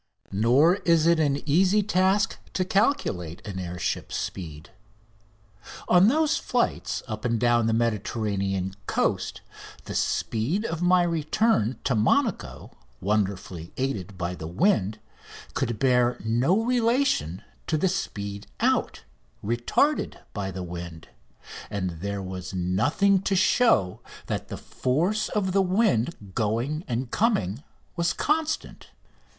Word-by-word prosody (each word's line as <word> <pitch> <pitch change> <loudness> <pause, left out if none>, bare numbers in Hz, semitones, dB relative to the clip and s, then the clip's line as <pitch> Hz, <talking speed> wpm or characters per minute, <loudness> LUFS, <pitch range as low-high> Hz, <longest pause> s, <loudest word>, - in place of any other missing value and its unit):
Nor 130 - +4
is 165 -4 +3
it 170 -1 +4
an 145 -1 0
easy 190 +7 +4
task 190 +1 +2
to 185 - 0
calculate 180 - 0
an 95 -3 -5
air 90 -1 -5
ship's - - -3
speed. 80 -3 -6 1.2
On 180 +2 +6
those 310 +5 +3
flights 95 - -1
up 110 -2 -5
and 115 -2 0
down 120 -1 +3
the - - +2
Mediterranean 100 -4 -1
coast - - -1 0.4
the - - -6
speed 145 - -1
of 165 -3 -3
my 180 0 +4
return 165 - +1
to 135 - +1
Monaco, 110 - 0 0.3
wonderfully 95 -4 -2
aided 100 -8 -3
by 90 0 -2
the 80 -3 -7
wind, 105 - +1 0.6
could 120 -2 -1
bear 125 -1 +3
no 130 - +2
relation 235 - +1 0.2
to 155 - +1
the 190 - +2
speed 100 - -4
out, - - 0 0.4
retarded 120 - +1 0.2
by 100 -2 -3
the 95 -1 -5
wind, 85 -2 -8 0.6
and 95 -5 -4
there 100 0 -3
was 95 0 -6
nothing 145 - +2
to 195 0 0
show 185 - +3 0.2
that - - -3
the - - -6
force 170 +12 -1
of 195 -3 -1
the 195 +1 +3
wind 180 - 0
going 120 - -1
and 120 0 -3
coming 145 - 0 0.3
was 170 0 +1
constant. 310 +1 -2
120 Hz, 125 wpm, -26 LUFS, -, 1.2 s, On